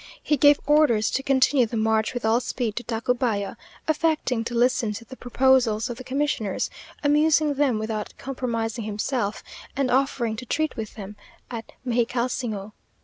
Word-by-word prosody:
He 300 - +2
gave 290 +1 +6
orders 295 -8 +4
to 270 - 0
continue 265 -2 +3
the 230 - -4
march 220 +1 +1
with 245 - -3
all 225 +2 +4
speed 240 -3 -3
to 240 - -2
Tacubaya, 230 -2 -1 0.3
affecting 305 -7 +1
to 240 - -4
listen 240 -2 +2
to 225 +3 -8
the 260 - -10
proposals 245 -3 +2
of 235 - -6
the 255 - -8
commissioners, 255 -6 -1 0.3
amusing 300 +1 +3
them 275 -5 +1
without 215 -1 -4
compromising 235 -4 -3
himself, 210 0 -2 0.3
and 275 -2 +1
offering 250 -3 +1
to 250 - -7
treat 310 +4 -1
with 220 -2 -6
them 205 -1 -8 0.3
at 225 -2 -6
Mexicalsingo. 235 -3 -1
245 Hz, 155 wpm, -24 LUFS, 220-270 Hz, 0.3 s, gave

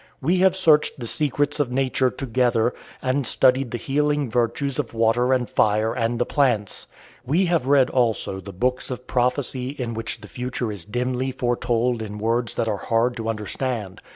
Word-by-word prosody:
We 175 +7 +1
have 190 0 +4
searched 155 -7 +3
the 120 - -5
secrets 145 +3 -1
of 140 -4 0
nature 130 0 +1
together, 120 -2 0 0.3
and 130 0 0
studied 130 -1 +3
the 120 - -3
healing 145 +1 0
virtues 125 +4 0
of 120 -5 -3
water 115 +3 +2
and 125 -2 +1
fire 110 +2 +2
and 120 0 -1
the 120 - +1
plants. 120 -9 0 0.4
We 165 +9 +2
have 170 -7 0
read 135 -2 +4
also 115 -6 0
the 95 +1 -9
books 125 +7 -1
of 125 -1 -6
prophecy 125 0 0
in 125 -4 -4
which 115 0 -4
the - - -10
future 125 -2 -3
is 100 -5 -5
dimly 125 +4 -2
foretold 120 -1 0
in 105 -1 -6
words 115 +2 0
that 115 - -1
are 105 -2 0
hard 115 +4 0
to 115 -1 -3
understand. 110 -1 -3
125 Hz, 180 wpm, -23 LUFS, 115-135 Hz, 0.4 s, have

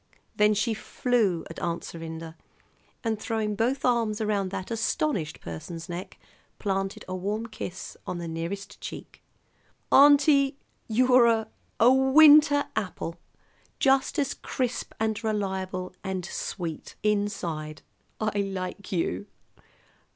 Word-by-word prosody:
Then 210 0 +4
she 210 +3 +1
flew 215 -6 0
at 165 - -8
Aunt 170 -1 -2
Serinda, 165 -1 -7 0.7
and, 225 -2 -1
throwing 220 -2 -1
both 245 +6 0
arms 230 -3 +2
around 205 -3 0
that 185 +2 -5
astonished 225 - -1
person's 165 - -7
neck, 175 +1 -6 0.4
planted 195 -1 -2
a 185 - -4
warm 205 +5 -2
kiss 190 -5 -7
on 180 - -3
the 170 -1 -5
nearest 170 +5 -5
cheek. - - -8 0.7
"Auntie, 280 -1 +6 0.3
you're 250 +1 +5
a 220 -1 +2 0.3
a 240 +3 +7
winter 290 +2 +7
apple! 175 -4 -3 0.6
Just 270 +2 +2
as 285 -3 +1
crisp 250 -2 -3
and 220 0 -1
reliable 190 -4 -2
and 190 -2 -3
sweet 170 -4 -5
inside! 175 -7 -1 0.4
I 215 -2 0
like 195 0 -4
you." 100 - -1
210 Hz, 120 wpm, -27 LUFS, 180-235 Hz, 0.7 s, a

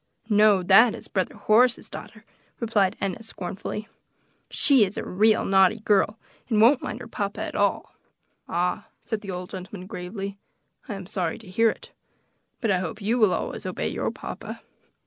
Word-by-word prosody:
"No; 210 -2 +5
that 215 +6 +6
is - - -8
brother 185 -2 -2
Horace's 225 +4 +3
daughter," - - -10 0.3
replied 215 -5 +1
Enna 195 +2 -3
scornfully; 210 0 -6 0.6
"she 270 -6 +4
is 195 0 -2
a - - -3
real 215 +4 +3
naughty 195 +2 +4
girl, 210 0 +2 0.3
and 220 -3 +2
won't 245 +5 +6
mind 225 +3 -5
her 235 - -8
papa 200 -3 -4
at - - -4
all." - - 0 0.6
"Ah!" 180 +4 -1
said 220 -2 -4
the 200 - -9
old 180 -1 -5
gentleman 185 0 -7
gravely, 195 +2 -6 0.5
"I 210 - -3
am 195 -1 -7
sorry 175 -3 -2
to 220 - -14
hear 225 +5 +3
it; - - -7 0.7
but 225 -4 +1
I 185 - +2
hope 210 +4 -5
you 225 +4 0
will 215 -4 +5
always 175 - -3
obey - - -3
your - - -2
papa." - - -8
205 Hz, 170 wpm, -25 LUFS, 190-220 Hz, 0.7 s, that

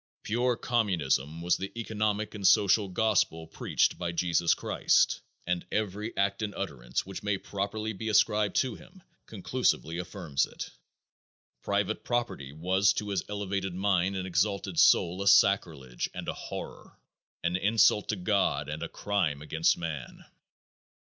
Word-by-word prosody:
Pure 120 +2 0
communism 85 - 0
was 90 - +2
the 95 +1 -5
economic 110 -1 -1
and 100 -3 +1
social 100 +2 +4
gospel 90 -5 +1
preached 80 - 0
by 85 -1 -2
Jesus 85 0 +2
Christ, - - +2 0.2
and 90 0 -1
every 105 +1 -3
act 100 +1 +1
and 105 -2 -3
utterance 70 -11 -3
which 95 0 -7
may 105 -1 0
properly 105 +3 -3
be 110 +3 -4
ascribed 105 0 +3
to 130 -3 +1
him 190 -2 -15 0.2
conclusively 100 -6 -1
affirms 90 -7 -2
it. - - -8 0.9
Private - - -1
property 120 - -2
was 95 +7 +2
to 105 - -4
his 95 -3 0
elevated 100 -2 -3
mind 95 0 +1
and 95 -1 -3
exalted 95 0 0
soul 90 +3 +4
a 100 - -2
sacrilege 80 -11 +3
and - - -6
a - - -1
horror; - - -8 0.5
an 85 +1 +1
insult 105 +1 +3
to 110 - +1
God 100 +1 0
and - - -5
a - - -4
crime 85 -9 -1
against 80 +2 +2
man. 80 -6 -6
95 Hz, 145 wpm, -29 LUFS, 85-105 Hz, 0.9 s, social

